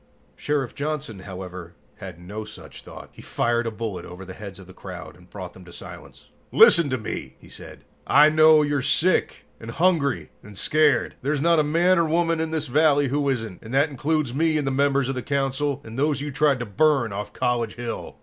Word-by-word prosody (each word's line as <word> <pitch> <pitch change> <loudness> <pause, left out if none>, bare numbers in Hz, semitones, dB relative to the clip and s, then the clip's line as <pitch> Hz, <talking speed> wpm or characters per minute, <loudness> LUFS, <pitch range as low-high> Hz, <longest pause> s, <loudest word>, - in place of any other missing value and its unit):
Sheriff 145 -5 -2
Johnson, 145 -7 -4
however, 90 -2 -9 0.2
had 95 -4 -9
no 100 +5 -7
such 105 0 -12
thought. - - -12
He - - -14
fired 120 0 -1
a - - -2
bullet 105 -5 -5
over 90 +2 -10
the 95 - -9
heads 100 -1 -9
of 95 - -12
the 95 - -14
crowd 90 -1 -9
and 90 0 -20
brought 90 -2 -8
them 95 - -14
to 85 - -13
silence. - - -12 0.2
"Listen 170 -4 +6
to 130 - -1
me," 110 - -6
he - - -18
said. - - -11 0.2
"I 145 +2 +7
know 155 0 +6
you're 145 -1 0
sick 145 - +1
and 115 - -9
hungry 160 -1 0
and 105 -1 -13
scared. 150 -2 +2
There's 145 +3 -1
not 165 +2 +3
a - - +4
man 170 +4 +3
or 170 - +3
woman 165 +1 +1
in 160 0 -1
this 160 -2 -2
valley 145 0 +3
who 140 +1 0
isn't, 115 -8 -3
and 110 - -10
that 145 +3 +3
includes 145 0 -1
me 160 +2 +1
and 150 - -1
the 135 - 0
members 140 0 +1
of 135 - -1
the 130 - -4
Council, 140 +1 -1
and 115 +3 -8
those 145 -1 +1
you 145 +1 -4
tried 145 0 +2
to - - -3
burn 130 -1 +1
off 105 +1 -5
College 120 -3 -1
Hill. 120 -1 -6
135 Hz, 215 wpm, -24 LUFS, 105-150 Hz, 0.2 s, I